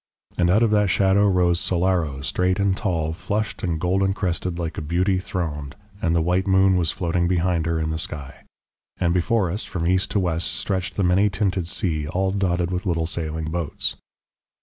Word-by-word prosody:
And 90 Hz, -1 st, +2 dB
out 105 Hz, +6 st, +4 dB
of 115 Hz, -, +2 dB
that 105 Hz, -2 st, +3 dB
shadow 95 Hz, +2 st, +3 dB
rose 90 Hz, -3 st, +2 dB
Solaro 85 Hz, -7 st, 0 dB
straight 90 Hz, +3 st, 0 dB
and 100 Hz, -1 st, +2 dB
tall, 85 Hz, -6 st, -1 dB
flushed 105 Hz, +5 st, -3 dB
and 85 Hz, -3 st, -1 dB
golden 95 Hz, +3 st, +1 dB
crested, 90 Hz, -2 st, -2 dB
like 85 Hz, -3 st, -3 dB
a -, -, -5 dB
beauty 90 Hz, +5 st, +1 dB
throned, 75 Hz, -6 st, -4 dB, 0.3 s
and 85 Hz, -1 st, +1 dB
the 85 Hz, -, +2 dB
white 90 Hz, +3 st, +1 dB
moon 95 Hz, 0 st, +4 dB
was 85 Hz, -3 st, +1 dB
floating 85 Hz, 0 st, 0 dB
behind 85 Hz, -2 st, +1 dB
her 85 Hz, -1 st, 0 dB
in 80 Hz, 0 st, -1 dB
the 80 Hz, -, -2 dB
sky. 70 Hz, -4 st, -6 dB, 0.5 s
And 85 Hz, -1 st, +1 dB
before 95 Hz, +1 st, +1 dB
us 100 Hz, +5 st, -2 dB
from 85 Hz, -3 st, -4 dB
east 95 Hz, +2 st, +2 dB
to 105 Hz, -, +1 dB
west 85 Hz, -2 st, -1 dB
stretched 95 Hz, -2 st, -2 dB
the 100 Hz, -, 0 dB
many 95 Hz, +3 st, +3 dB
tinted 95 Hz, -3 st, -1 dB
sea 80 Hz, -5 st, -1 dB
all 95 Hz, +4 st, 0 dB
dotted 90 Hz, -3 st, 0 dB
with 90 Hz, +1 st, -3 dB
little 80 Hz, -2 st, 0 dB
sailing 80 Hz, -1 st, -3 dB
boats. 85 Hz, -2 st, -1 dB
90 Hz, 195 wpm, -23 LUFS, 85-95 Hz, 0.5 s, out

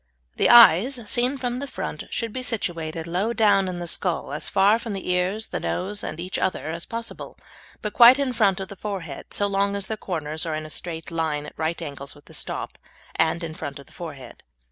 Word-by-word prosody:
The -, -, +3 dB
eyes, 240 Hz, +2 st, +8 dB
seen 250 Hz, +5 st, +1 dB
from 245 Hz, -1 st, -2 dB
the 280 Hz, -, -4 dB
front, -, -, -5 dB
should 230 Hz, -2 st, -2 dB
be 255 Hz, -, -3 dB
situated 165 Hz, -9 st, -2 dB
low 185 Hz, +7 st, -1 dB
down 205 Hz, -4 st, +4 dB
in 180 Hz, -1 st, -3 dB
the 175 Hz, -, -4 dB
skull, 170 Hz, -3 st, -2 dB
as 150 Hz, -, -3 dB
far 205 Hz, +3 st, +4 dB
from 230 Hz, -3 st, -5 dB
the 190 Hz, -2 st, -3 dB
ears, 185 Hz, +5 st, 0 dB
the -, -, -3 dB
nose, 205 Hz, +3 st, -3 dB
and 155 Hz, -, -5 dB
each 180 Hz, +2 st, -3 dB
other 185 Hz, -4 st, -1 dB
as 170 Hz, +1 st, -5 dB
possible, 230 Hz, 0 st, -6 dB, 0.5 s
but 210 Hz, -, -2 dB
quite 240 Hz, +2 st, +9 dB
in 275 Hz, -3 st, 0 dB
front 205 Hz, -5 st, +3 dB
of 190 Hz, -, -5 dB
the 200 Hz, -, -8 dB
forehead, 185 Hz, -8 st, -6 dB
so 205 Hz, -, +2 dB
long 200 Hz, 0 st, +1 dB
as 200 Hz, -1 st, -3 dB
their 220 Hz, +2 st, -4 dB
corners 155 Hz, -5 st, -4 dB
are 160 Hz, -2 st, -2 dB
in 155 Hz, 0 st, -4 dB
a 155 Hz, -, -8 dB
straight 165 Hz, -1 st, -5 dB
line 160 Hz, -3 st, -1 dB
at -, -, -9 dB
right 160 Hz, +1 st, -2 dB
angles 140 Hz, -3 st, -7 dB
with 145 Hz, -, -18 dB
the -, -, -15 dB
stop, -, -, -3 dB, 0.4 s
and 160 Hz, +2 st, +1 dB
in 160 Hz, -1 st, -4 dB
front 140 Hz, -3 st, -6 dB
of 140 Hz, -, -12 dB
the -, -, -21 dB
forehead. 150 Hz, -7 st, -9 dB
185 Hz, 225 wpm, -24 LUFS, 160-215 Hz, 0.5 s, quite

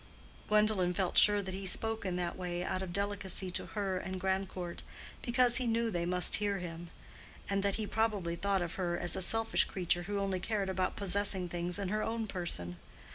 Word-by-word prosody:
Gwendolen 210 Hz, -4 st, +3 dB
felt 185 Hz, -1 st, 0 dB
sure 205 Hz, -1 st, +6 dB
that 190 Hz, -1 st, -5 dB
he 190 Hz, 0 st, -3 dB
spoke 225 Hz, +2 st, 0 dB
in 180 Hz, -, -1 dB
that 175 Hz, -1 st, -2 dB
way 175 Hz, -1 st, -3 dB
out 185 Hz, -, -1 dB
of 190 Hz, -2 st, -4 dB
delicacy 200 Hz, -1 st, -1 dB
to -, -, -3 dB
her 195 Hz, -3 st, -2 dB
and 185 Hz, +1 st, -4 dB
Grandcourt—because 195 Hz, +6 st, -1 dB
he 255 Hz, -2 st, 0 dB
knew 230 Hz, 0 st, +1 dB
they 170 Hz, -2 st, -1 dB
must 180 Hz, 0 st, +2 dB
hear 205 Hz, -1 st, 0 dB
him; 170 Hz, -1 st, -6 dB, 0.6 s
and 200 Hz, 0 st, +1 dB
that 200 Hz, 0 st, +1 dB
he 220 Hz, -, -2 dB
probably 205 Hz, -6 st, 0 dB
thought 195 Hz, +1 st, +1 dB
of 170 Hz, -, -4 dB
her 175 Hz, -1 st, 0 dB
as 175 Hz, -1 st, +1 dB
a -, -, -2 dB
selfish 225 Hz, +5 st, +3 dB
creature 175 Hz, -1 st, 0 dB
who 200 Hz, +3 st, -3 dB
only 195 Hz, -2 st, 0 dB
cared 200 Hz, 0 st, -1 dB
about 185 Hz, -1 st, 0 dB
possessing 200 Hz, -1 st, 0 dB
things 175 Hz, +1 st, -2 dB
in 200 Hz, -2 st, -2 dB
her 215 Hz, +2 st, 0 dB
own 225 Hz, 0 st, -1 dB
person. 170 Hz, -, -4 dB
190 Hz, 195 wpm, -33 LUFS, 180-205 Hz, 0.6 s, sure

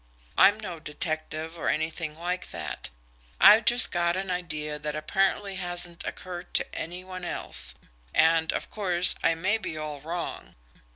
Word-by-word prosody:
I'm 205 Hz, +2 st, +6 dB
no 180 Hz, -6 st, -6 dB
detective 155 Hz, +1 st, -4 dB
or -, -, -1 dB
anything 160 Hz, 0 st, -2 dB
like 180 Hz, +2 st, -3 dB
that. -, -, -6 dB, 0.5 s
I've 215 Hz, +3 st, +8 dB
just 240 Hz, +1 st, +7 dB
got 175 Hz, 0 st, +1 dB
an 190 Hz, -1 st, -3 dB
idea 150 Hz, -4 st, -3 dB
that 150 Hz, 0 st, -4 dB
apparently 195 Hz, +5 st, 0 dB
hasn't 175 Hz, -1 st, -3 dB
occurred 180 Hz, -1 st, -7 dB
to -, -, +4 dB
any 175 Hz, +3 st, -4 dB
one 185 Hz, -1 st, -8 dB
else 65 Hz, -, 0 dB, 0.4 s
and, 160 Hz, 0 st, +3 dB
of -, -, -4 dB
course, 180 Hz, -4 st, +3 dB
I 165 Hz, -, +3 dB
may 190 Hz, +7 st, +1 dB
be 160 Hz, -, -5 dB
all 150 Hz, -2 st, -5 dB
wrong. 170 Hz, +3 st, -6 dB
175 Hz, 155 wpm, -27 LUFS, 155-185 Hz, 0.5 s, I've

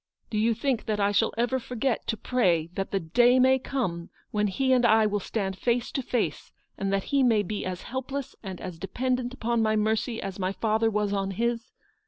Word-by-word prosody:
Do 215 Hz, -, 0 dB
you 225 Hz, +1 st, +2 dB
think 245 Hz, 0 st, -1 dB
that 215 Hz, -1 st, 0 dB
I 200 Hz, 0 st, +3 dB
shall 210 Hz, +2 st, +2 dB
ever 245 Hz, +3 st, +1 dB
forget 250 Hz, 0 st, -2 dB
to 225 Hz, -, -1 dB
pray 175 Hz, -9 st, +1 dB
that 195 Hz, 0 st, -3 dB
the 195 Hz, -, 0 dB
day 240 Hz, +9 st, +4 dB
may 260 Hz, +1 st, +5 dB
come 185 Hz, -11 st, -3 dB, 0.2 s
when 210 Hz, 0 st, +1 dB
he 260 Hz, +7 st, +1 dB
and 250 Hz, -1 st, +3 dB
I 220 Hz, -1 st, +5 dB
will 210 Hz, -1 st, 0 dB
stand 190 Hz, -2 st, -3 dB
face 240 Hz, -1 st, 0 dB
to 270 Hz, -, -1 dB
face, 245 Hz, -2 st, -2 dB, 0.2 s
and 195 Hz, 0 st, -2 dB
that 195 Hz, -1 st, +1 dB
he 280 Hz, -, +4 dB
may 225 Hz, -5 st, +4 dB
be 205 Hz, +2 st, -4 dB
as 185 Hz, -1 st, -5 dB
helpless 265 Hz, +2 st, -5 dB
and 190 Hz, -4 st, -7 dB
as 180 Hz, -3 st, -7 dB
dependent 250 Hz, +6 st, -1 dB
upon 235 Hz, -2 st, -1 dB
my 215 Hz, 0 st, +2 dB
mercy 220 Hz, +2 st, 0 dB
as 195 Hz, 0 st, -5 dB
my 185 Hz, +1 st, -1 dB
father 220 Hz, +1 st, +1 dB
was 210 Hz, -1 st, 0 dB
on 195 Hz, -1 st, -1 dB
his 235 Hz, +4 st, -2 dB
220 Hz, 215 wpm, -27 LUFS, 195-245 Hz, 0.2 s, may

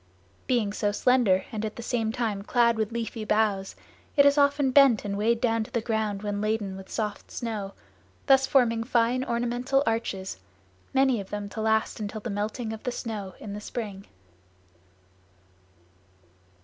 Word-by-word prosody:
Being 225 Hz, -5 st, +1 dB
so 205 Hz, 0 st, 0 dB
slender 210 Hz, -4 st, +3 dB
and 215 Hz, -1 st, -4 dB
at 215 Hz, -1 st, -4 dB
the 235 Hz, -, -7 dB
same 225 Hz, -2 st, -1 dB
time 225 Hz, -4 st, -2 dB
clad 235 Hz, +2 st, +3 dB
with 220 Hz, 0 st, -1 dB
leafy 230 Hz, -1 st, -4 dB
boughs, 210 Hz, -2 st, +1 dB, 0.4 s
it 280 Hz, -, +7 dB
is 285 Hz, 0 st, +6 dB
often 285 Hz, -2 st, +3 dB
bent 265 Hz, -6 st, +5 dB
and 200 Hz, -1 st, -2 dB
weighed 225 Hz, +3 st, +1 dB
down 230 Hz, -2 st, +1 dB
to -, -, -13 dB
the 235 Hz, -, -1 dB
ground 220 Hz, -3 st, -2 dB
when 205 Hz, -1 st, -2 dB
laden 210 Hz, -2 st, -1 dB
with 190 Hz, 0 st, -10 dB
soft 210 Hz, -2 st, -4 dB
snow; 210 Hz, -4 st, -4 dB, 0.5 s
thus 270 Hz, 0 st, +5 dB
forming 230 Hz, -4 st, +3 dB
fine 240 Hz, +1 st, +1 dB
ornamental 245 Hz, +3 st, 0 dB
arches, 195 Hz, -, -2 dB, 0.5 s
many 265 Hz, -4 st, +3 dB
of 190 Hz, -, -11 dB
them 205 Hz, -1 st, -4 dB
to 220 Hz, -, -5 dB
last 220 Hz, 0 st, +1 dB
until 215 Hz, +1 st, -4 dB
the 225 Hz, +1 st, -5 dB
melting 220 Hz, +3 st, -3 dB
of 220 Hz, -, -8 dB
the 250 Hz, -, -2 dB
snow 210 Hz, -6 st, -5 dB
in 205 Hz, -, -7 dB
the 210 Hz, -, -6 dB
spring. 205 Hz, -3 st, -6 dB
220 Hz, 165 wpm, -27 LUFS, 205-240 Hz, 0.5 s, it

